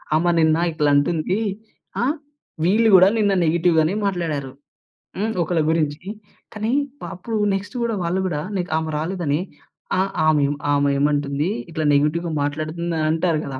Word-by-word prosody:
ఆమె 175 Hz, +2 st, +3 dB
నిన్న 160 Hz, 0 st, +4 dB
ఇట్లా 150 Hz, -2 st, +1 dB
అంటుంది. 165 Hz, +7 st, +1 dB, 0.6 s
ఆహ్, 285 Hz, +5 st, +1 dB, 0.5 s
వీళ్ళు 220 Hz, +5 st, +4 dB
గూడా 185 Hz, +1 st, +8 dB
నిన్న 205 Hz, -2 st, +3 dB
నెగెటివ్ 170 Hz, +1 st, +2 dB
గానే 160 Hz, +5 st, +1 dB
మాట్లాడారు, 160 Hz, -8 st, -2 dB, 0.7 s
హ్మ్. 220 Hz, +3 st, -1 dB
ఒకళ్ళ 165 Hz, 0 st, 0 dB
గురించి. 155 Hz, -2 st, -1 dB, 0.5 s
కానీ 215 Hz, +4 st, -1 dB, 0.4 s
అప్పుడు 220 Hz, +5 st, -4 dB, 0.2 s
నెక్స్ట్ 200 Hz, +3 st, -4 dB
గూడా 230 Hz, -2 st, 0 dB
వాళ్ళు 175 Hz, +3 st, 0 dB
గూడా 150 Hz, -4 st, -2 dB, 0.2 s
నీకు 175 Hz, -3 st, -3 dB
ఆమె 160 Hz, 0 st, -2 dB
రాలేదని 160 Hz, -3 st, -1 dB, 0.6 s
ఆ -, -, +4 dB, 0.3 s
ఆమె 150 Hz, -2 st, +4 dB, 0.3 s
ఆమె 140 Hz, 0 st, +2 dB
ఏమంటుంది? 145 Hz, +2 st, 0 dB, 0.2 s
ఇట్లా 160 Hz, -1 st, -2 dB
నెగెటివ్‌గా 155 Hz, +4 st, +1 dB
మాట్లాడుతుందని 155 Hz, +2 st, -2 dB
అంటారు 165 Hz, 0 st, +1 dB
గదా! 130 Hz, -1 st, -6 dB
165 Hz, 140 wpm, -21 LUFS, 150-185 Hz, 0.7 s, గూడా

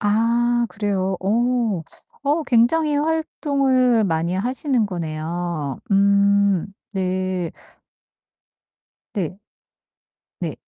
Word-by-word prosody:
아 235 Hz, +3 st, +2 dB
그래요? 195 Hz, -3 st, -1 dB
어. 230 Hz, -2 st, +1 dB, 0.4 s
어 300 Hz, +3 st, +2 dB
굉장히 280 Hz, +5 st, +3 dB
활동을 275 Hz, -6 st, +1 dB
많이 170 Hz, 0 st, 0 dB
하시는 250 Hz, +3 st, +1 dB
거네요. 165 Hz, -4 st, -4 dB
음 200 Hz, -1 st, +3 dB, 0.2 s
네. 185 Hz, -2 st, -2 dB, 1.6 s
네. 185 Hz, -2 st, -3 dB, 1.0 s
네. -, -, -3 dB
200 Hz, 135 characters per minute, -21 LUFS, 185-245 Hz, 1.6 s, 굉장히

